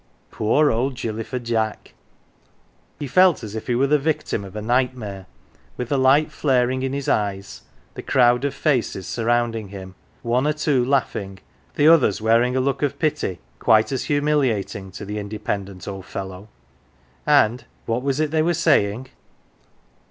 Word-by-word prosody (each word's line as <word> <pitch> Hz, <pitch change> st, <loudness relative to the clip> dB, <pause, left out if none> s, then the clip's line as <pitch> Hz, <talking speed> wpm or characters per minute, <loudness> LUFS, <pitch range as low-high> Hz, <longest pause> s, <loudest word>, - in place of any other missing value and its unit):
Poor 145 Hz, +8 st, +2 dB
old 125 Hz, +4 st, -1 dB
Gilly 115 Hz, -2 st, -4 dB
fer 130 Hz, -, -5 dB
Jack! 115 Hz, -3 st, -2 dB, 1.0 s
He 145 Hz, -, -5 dB
felt 180 Hz, +5 st, +4 dB
as 105 Hz, -2 st, -7 dB
if 110 Hz, -, -6 dB
he 120 Hz, -, +1 dB
were 130 Hz, +3 st, +3 dB
the 150 Hz, +2 st, +3 dB
victim 145 Hz, -7 st, -2 dB
of 95 Hz, +1 st, -11 dB
a -, -, -3 dB
nightmare, 120 Hz, -5 st, -1 dB, 0.5 s
with 125 Hz, -, -4 dB
the 140 Hz, -, +1 dB
light 135 Hz, +4 st, +4 dB
flaring 130 Hz, -2 st, +1 dB
in 135 Hz, 0 st, -2 dB
his 140 Hz, 0 st, -4 dB
eyes, 100 Hz, -2 st, -2 dB, 0.3 s
the -, -, -7 dB
crowd 120 Hz, 0 st, +3 dB
of 140 Hz, -, -1 dB
faces 125 Hz, -, 0 dB
surrounding 115 Hz, -2 st, -1 dB
him, 95 Hz, -1 st, -9 dB, 0.3 s
one 125 Hz, +4 st, +1 dB
or 150 Hz, -, +2 dB
two 145 Hz, -4 st, +1 dB
laughing, 115 Hz, -7 st, -1 dB, 0.4 s
the 145 Hz, -, +4 dB
others 155 Hz, -11 st, +5 dB
wearing 115 Hz, +3 st, +2 dB
a -, -, +2 dB
look 135 Hz, +1 st, -1 dB
of 140 Hz, -1 st, -1 dB
pity 150 Hz, -, -1 dB, 0.2 s
quite 110 Hz, 0 st, +3 dB
as 135 Hz, -, -2 dB
humiliating 140 Hz, -10 st, 0 dB
to 100 Hz, +3 st, -9 dB
the 105 Hz, +1 st, -4 dB
independent 100 Hz, -2 st, -5 dB
old 95 Hz, -1 st, -7 dB
fellow. 95 Hz, +2 st, -7 dB, 0.8 s
And 125 Hz, -5 st, +3 dB, 0.2 s
what 115 Hz, +2 st, -1 dB
was 135 Hz, +1 st, -1 dB
it 155 Hz, -1 st, 0 dB
they 160 Hz, -1 st, +2 dB
were 170 Hz, +2 st, +1 dB
saying 130 Hz, -7 st, +1 dB
120 Hz, 165 wpm, -22 LUFS, 105-140 Hz, 1.0 s, others